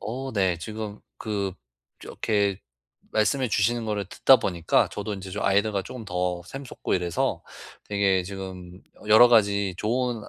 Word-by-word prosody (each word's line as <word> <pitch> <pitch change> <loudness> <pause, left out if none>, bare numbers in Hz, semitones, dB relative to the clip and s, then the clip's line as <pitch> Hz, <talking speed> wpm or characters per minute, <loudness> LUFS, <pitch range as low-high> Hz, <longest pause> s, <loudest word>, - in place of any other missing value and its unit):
어 130 +4 -5
네 95 -4 +1
지금 105 +3 -6 0.2
그 100 -3 -2 0.5
이렇게 100 -3 -1 0.5
말씀해 125 +4 +1
주시는 115 +3 +1
거를 105 -2 -2
듣다 135 - +5
보니까 85 -6 +1
저도 105 +1 -5
인제 95 -1 -8
좀 105 - -4
아이디어가 100 0 +2
쪼금 115 +1 -8
더 90 -1 -2
샘솟고 135 +2 -4
이래서 90 -2 -1 0.5
되게 100 -2 +2
지금 95 -1 -8 0.3
여러 110 +3 +9
가지 100 -4 +3
좋은 120 +1 -1
아 - - -12
100 Hz, 300 characters per minute, -25 LUFS, 95-110 Hz, 0.5 s, 여러